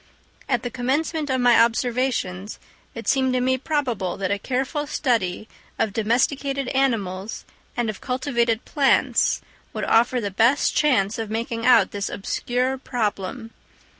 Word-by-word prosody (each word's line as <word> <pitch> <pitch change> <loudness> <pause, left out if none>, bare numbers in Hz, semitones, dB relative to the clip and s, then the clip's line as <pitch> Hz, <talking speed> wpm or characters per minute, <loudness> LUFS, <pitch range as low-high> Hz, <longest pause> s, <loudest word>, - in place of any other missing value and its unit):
At 245 -3 +1
the 245 - -4
commencement 290 +5 -1
of 260 -1 +1
my 245 -2 +6
observations 230 -5 0 0.4
it 230 - -7
seemed 260 -1 +2
to 255 - +2
me 260 +1 +1
probable 250 - -1
that 195 0 -2
a 200 - 0
careful 270 - -2
study 220 -9 -1 0.3
of 215 - 0
domesticated 260 +5 0
animals 220 -7 -1 0.3
and 240 -1 0
of 215 -3 -5
cultivated 245 -3 0
plants 280 -3 +2 0.3
would - - -4
offer 240 +2 +3
the 205 -3 -3
best 230 +8 +3
chance 225 -9 +2
of 225 -2 -4
making 230 +1 -2
out 255 - +5
this 200 0 -3
obscure 250 +6 -2
problem. 225 -2 -3
245 Hz, 140 wpm, -23 LUFS, 220-265 Hz, 0.4 s, my